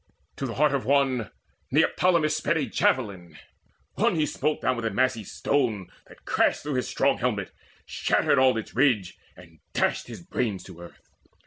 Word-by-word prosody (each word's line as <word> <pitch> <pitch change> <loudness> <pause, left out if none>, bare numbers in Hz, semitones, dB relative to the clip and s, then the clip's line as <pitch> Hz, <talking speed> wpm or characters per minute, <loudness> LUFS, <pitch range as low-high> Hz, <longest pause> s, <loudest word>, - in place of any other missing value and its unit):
To 135 - -3
the 115 - -6
heart 150 0 +3
Of 140 - 0
one 135 -4 +1 0.4
Neoptolemus 160 +1 +2
sped 155 +1 0
a 150 - 0
javelin; 100 -9 -1 0.6
one - - +1
He 155 -2 +2
smote 150 +1 -2
down 130 - +2
with 120 -1 -4
a - - +1
massy 115 +1 0
stone 115 -4 -1 0.2
that - - -18
crashed - - +1
Through 150 0 -3
his 125 -1 -1
strong 135 0 +1
helmet, 110 -6 -2 0.3
shattered - - +1
all 130 -3 +4
its 110 - -6
ridge, 120 -9 +1 0.2
And 85 -2 -16
dashed - - 0
his - - -9
brains 105 -7 -2
to 85 -2 -12
earth. 85 - -13
130 Hz, 175 wpm, -26 LUFS, 105-140 Hz, 0.6 s, all